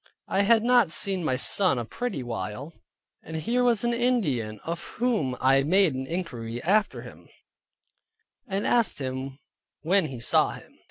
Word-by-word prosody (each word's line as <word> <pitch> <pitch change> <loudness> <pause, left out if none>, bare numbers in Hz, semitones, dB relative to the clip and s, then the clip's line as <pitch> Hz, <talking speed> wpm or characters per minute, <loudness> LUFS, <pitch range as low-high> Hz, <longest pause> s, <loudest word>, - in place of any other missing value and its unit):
I 195 - +1
had 220 +2 +4
not 245 -5 +4
seen 190 +2 +1
my 130 -5 0
son 180 +3 +2
a 120 - -3
pretty 240 - -4
while, 120 +5 -6 0.5
and 160 - -9
here 235 +10 0
was 235 -3 +2
an 240 0 +1
Indian 155 - 0
of 170 +1 -4
whom 210 - -1
I 135 +1 +4
made 175 +1 +2
inquiry 130 -5 -5
after 210 +5 +1
him, - - -14 1.2
and 195 -1 -2
asked 235 -2 +3
him 130 0 -5 0.4
when 175 +2 +2
he 130 -4 -8
saw 115 - +2
him. - - -15
165 Hz, 155 wpm, -26 LUFS, 130-215 Hz, 1.2 s, had